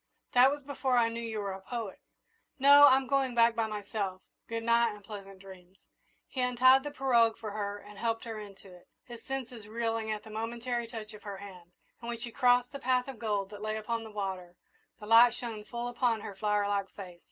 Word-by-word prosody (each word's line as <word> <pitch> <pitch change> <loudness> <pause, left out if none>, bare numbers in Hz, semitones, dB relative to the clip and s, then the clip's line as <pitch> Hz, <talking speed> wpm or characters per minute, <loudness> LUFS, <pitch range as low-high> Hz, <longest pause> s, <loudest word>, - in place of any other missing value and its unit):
"That 250 +1 +7
was 290 0 -4
before 265 -2 -1
I 230 -1 +4
knew 230 +1 -5
you 225 -2 -4
were 200 -2 -3
a 190 - -9
poet. 225 -1 -6 0.6
No, 285 +1 +8
I'm 265 0 +4
going 270 -2 0
back 230 0 +5
by 225 -1 0
myself 205 -3 -4 0.3
good 230 0 -3
night, 235 -1 +3
and 205 - -15
pleasant 195 -2 -9
dreams!" 190 -1 -14 0.5
He 260 - -4
untied 255 +2 +5
the 290 - -5
pirogue 240 -5 +2
for 220 -2 -6
her 205 -1 -3
and 205 0 -13
helped 230 -1 -1
her 225 -3 -6
into 195 -2 -12
it, 180 - -17 0.2
his 235 -2 -10
senses 250 -5 -5
reeling 225 0 -2
at 215 -1 -3
the 220 - -12
momentary 235 +2 -3
touch 220 -2 -8
of 210 - -12
her 200 -2 -7
hand; 180 -3 -12 0.3
and 235 - -9
when 235 - -3
she 235 +1 -7
crossed 245 +1 +3
the 280 - -7
path 255 -1 +1
of 265 -5 -8
gold 205 -3 -2
that 205 -1 -9
lay 215 0 -2
upon 230 +1 -3
the 220 - -9
water, 190 -4 -5 0.4
the 210 - -9
light 230 +2 +7
shone 225 -3 -6
full 240 +1 -5
upon 240 -2 0
her 205 - -7
flower 210 0 0
like 200 -1 -1
face. 180 -3 -10
225 Hz, 220 wpm, -30 LUFS, 205-245 Hz, 0.6 s, No